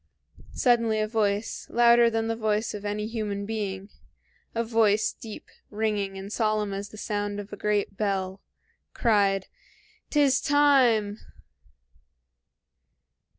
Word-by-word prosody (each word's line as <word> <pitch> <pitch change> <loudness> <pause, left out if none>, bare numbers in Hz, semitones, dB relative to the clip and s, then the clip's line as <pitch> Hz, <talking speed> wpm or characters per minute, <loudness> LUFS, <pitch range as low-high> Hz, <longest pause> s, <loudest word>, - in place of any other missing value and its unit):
Suddenly 230 -3 +2
a 215 - 0
voice, 210 -1 -1
louder 235 0 +5
than 225 0 -1
the 225 - -1
voice 215 -1 -1
of 210 -1 -7
any 210 +1 -2
human 210 -3 -3
being, 200 -2 -4 0.6
a 230 - +1
voice 220 -2 +2
deep, 220 -2 -10 0.2
ringing, 205 -2 -2
and 195 +2 -7
solemn 215 -2 0
as 200 +1 -5
the 215 - -12
sound 205 -1 -3
of 205 0 -8
a - - -3
great 205 -1 -1
bell, 195 -2 -2 0.5
cried, 200 -4 +2 0.6
"'T 295 - +1
is 280 -2 +4
time!" 255 -8 +3
215 Hz, 125 wpm, -26 LUFS, 205-225 Hz, 0.6 s, louder